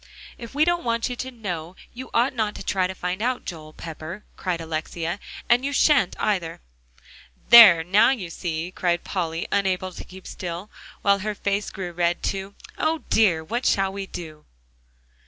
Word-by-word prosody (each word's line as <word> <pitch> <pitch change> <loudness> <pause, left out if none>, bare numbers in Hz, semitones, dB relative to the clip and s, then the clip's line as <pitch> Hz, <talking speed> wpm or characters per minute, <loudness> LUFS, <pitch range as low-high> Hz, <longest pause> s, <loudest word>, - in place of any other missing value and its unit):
"If 235 +2 -10
we 300 +2 +4
don't 345 0 +1
want 230 0 0
you 245 - -4
to 260 - -4
know, 180 -8 -6 0.2
you 260 +2 -8
ought 245 +3 +2
not 215 -4 -1
to - - -7
try 185 -2 +1
to 190 - -6
find 180 +2 -3
out, 250 +2 -1
Joel 155 -3 -7
Pepper," 165 +5 -8
cried 180 -3 -2
Alexia. 165 +2 -4 0.3
"And 240 +2 +4
you 280 - -1
shan't, 280 - +3
either." 180 -6 -1 0.9
"There, 210 -9 +10
now 190 +5 +5
you 205 -11 -2
see," 165 0 -4
cried 175 -2 0
Polly, 170 -3 -3
unable 185 -2 0
to - - -8
keep 190 0 -13
still, 180 +3 -6 0.3
while 200 0 +4
her 210 +2 -3
face 200 +1 -1
grew 185 -2 -6
red 175 0 0
too. 195 0 -3 0.2
"O 315 0 0
dear! 180 -8 +4
what 235 +9 -3
shall 195 -1 +2
we 195 -1 -5
do?" 155 -4 -9
190 Hz, 175 wpm, -24 LUFS, 170-225 Hz, 0.9 s, There